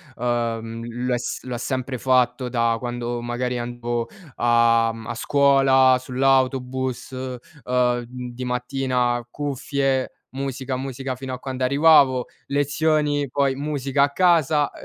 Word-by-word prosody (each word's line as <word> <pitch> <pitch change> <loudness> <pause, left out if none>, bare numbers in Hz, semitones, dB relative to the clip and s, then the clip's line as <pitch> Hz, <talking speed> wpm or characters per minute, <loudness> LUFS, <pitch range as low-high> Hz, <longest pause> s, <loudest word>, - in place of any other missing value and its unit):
Ehm, 115 -1 -2
lo 125 +2 -2
ha - - 0
s 120 - -4
lo 125 -1 -5
ha - - -3
sempre 130 +1 -3
fatto 130 0 +2
da 115 -1 +1
quando, 120 0 -4
magari, 125 +1 -2
andavo, 120 -1 -3 0.3
uhm, 115 -1 +2
a - - -3
scuola, 135 -1 +4
sull'autobus. 130 0 0 0.5
Ehm, 125 -1 +1
di 125 0 -7
mattina: 125 -1 -1
cuffie, 135 -1 -1 0.2
musica, 130 -1 -4
musica 135 0 -4
fino 130 0 -6
a 125 - -5
quando 130 -1 -4
arrivavo. 140 -2 +5 0.2
Lezioni, 145 0 +1
poi 135 +1 0
musica 140 -1 0
a 145 - +3
casa, 155 -3 +3
130 Hz, 125 wpm, -23 LUFS, 120-135 Hz, 0.5 s, arrivavo